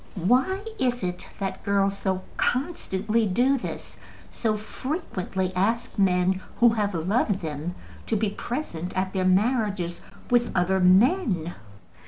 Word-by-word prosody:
Why 255 - +2 0.2
is 245 -3 0
it 180 0 -3
that 195 -2 -3
girls 200 0 +2
so 190 -1 -2
constantly 230 - 0
do 250 +8 +3
this, - - -7 0.3
so 220 -2 0
frequently 200 - -3
ask 215 +4 0
men 185 0 +3 0.2
who 240 - +7
have 210 -4 0
loved 195 +4 +1
them 160 +2 -4 0.3
to 225 - +1
be 210 -1 0
present 190 - -4
at 185 0 -1
their 185 -2 0
marriages 200 -3 +1 0.3
with 240 -1 +3
other 190 +1 +2
men? 185 - +3
200 Hz, 130 wpm, -26 LUFS, 185-235 Hz, 0.3 s, who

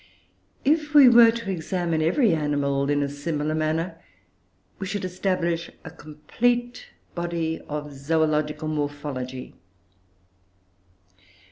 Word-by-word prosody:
If 300 +1 +1
we 285 -3 +9
were 235 -1 +8
to 230 -3 -3
examine 170 -2 -2
every 180 - +3
animal 145 -2 0
in 145 0 +2
a - - -1
similar 150 +1 -3
manner, 160 +2 -2 0.8
we 195 - -4
should 200 0 -3
establish 180 -2 -1 0.2
a - - -7
complete 240 +12 -2 0.3
body 170 -2 -2
of 150 -1 -5
zoological 155 +1 0
morphology. 145 -4 -4
160 Hz, 105 wpm, -24 LUFS, 150-185 Hz, 0.8 s, we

